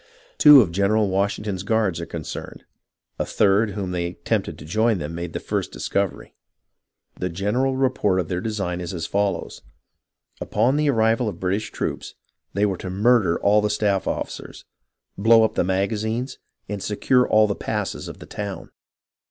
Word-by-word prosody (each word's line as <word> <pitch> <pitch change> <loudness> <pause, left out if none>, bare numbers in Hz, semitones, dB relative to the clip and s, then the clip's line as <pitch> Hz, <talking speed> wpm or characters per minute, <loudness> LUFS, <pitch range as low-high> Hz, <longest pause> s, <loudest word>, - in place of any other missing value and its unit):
Two 150 -3 +10
of 95 -7 -1
General 100 +3 +2
Washington's 100 0 -1
guards 100 -4 0
are 85 - -6
concerned; 80 -3 -7 0.6
a - - +2
third 100 +1 +2
whom 95 -2 -4
they 85 -1 -2
tempted 85 -1 -2
to - - -11
join 110 +6 +1
them 80 -1 -5
made 85 0 -5
the - - -3
first - - -3
discovery. 100 -2 -3 0.9
The 90 - -1
general 110 +10 0
report 125 -8 +1
of 90 - -2
their 90 +1 -2
design 95 -5 -3
is 90 +1 -5
as 85 -1 -3
follows: 100 0 -2 0.8
upon 130 +4 +1
the 150 0 +2
arrival 115 -1 +2
of 100 - -6
the - - -18
British 95 +4 -1
troops, - - -4 0.4
they 100 +2 +2
were 95 -3 -1
to 95 - -6
murder 100 -2 +3
all 105 +1 +4
the 105 - 0
staff 105 -2 0
officers, - - -5 0.5
blow 115 +2 +6
up 110 - +1
the - - +1
magazines, 110 +7 -1 0.3
and 100 -1 -4
secure 125 +5 +2
all 110 0 +5
the 105 - 0
passes - - -4
of - - -8
the - - -11
town. 100 -2 -6
100 Hz, 170 wpm, -23 LUFS, 90-110 Hz, 0.9 s, Two